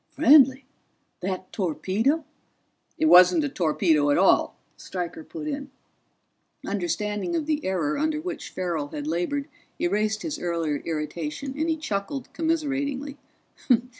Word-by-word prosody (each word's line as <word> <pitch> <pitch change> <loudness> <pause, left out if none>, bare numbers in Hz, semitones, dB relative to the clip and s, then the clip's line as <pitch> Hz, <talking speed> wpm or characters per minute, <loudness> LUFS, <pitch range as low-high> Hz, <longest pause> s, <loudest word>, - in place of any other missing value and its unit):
"Friendly? 275 -3 +5 0.5
That 185 0 -4
torpedo 205 - 0 0.3
" - - -45 0.3
"It 315 - +1
wasn't 300 - +7
a 290 - -1
torpedo 160 - +2
at 145 - +3
all," 190 - +4 0.2
Stryker 175 -3 -5
put 310 - -7
in. 285 -1 -4 1.0
Understanding 210 - -2
of 320 -3 -1
the 305 0 -1
error 170 -6 -1
under 310 0 0
which 345 0 -5
Farrell 170 -5 -3
had 145 0 -6
labored 175 - -1 0.3
erased 210 +4 0
his 310 -2 -4
earlier 165 -4 -1
irritation, 160 - -4
and 315 +3 -1
he 320 - +1
chuckled 265 -2 -4
commiseratingly. 285 -3 -2
215 Hz, 130 wpm, -25 LUFS, -, 1.0 s, wasn't